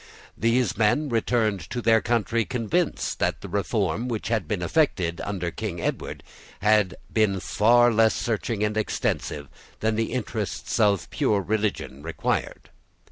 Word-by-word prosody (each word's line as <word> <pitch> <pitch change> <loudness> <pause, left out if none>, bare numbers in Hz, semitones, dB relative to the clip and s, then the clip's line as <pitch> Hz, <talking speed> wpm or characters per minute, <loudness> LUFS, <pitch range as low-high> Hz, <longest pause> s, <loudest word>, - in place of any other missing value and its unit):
These 115 -1 +1
men 140 +8 +2
returned 115 -3 +1
to 125 - -3
their 115 -2 +4
country 115 -1 +1
convinced 135 +9 -1
that - - 0
the - - -7
reform 120 +4 -1
which 115 -3 -3
had 110 -8 0
been 90 -1 -2
effected 85 - +1
under 90 -4 -3
King 100 -4 -5
Edward - - -3 0.4
had 105 -3 +3 0.2
been 105 -3 +2
far 120 +5 +4
less 110 0 +4
searching 110 -1 -1
and 105 0 0
extensive 75 -8 -2 0.3
than 110 0 +1
the 115 0 -1
interests 125 -4 -3
of 100 -5 +3
pure 130 -9 +1
religion 100 -8 -2
required. 85 +2 -3
110 Hz, 140 wpm, -25 LUFS, 100-115 Hz, 0.4 s, their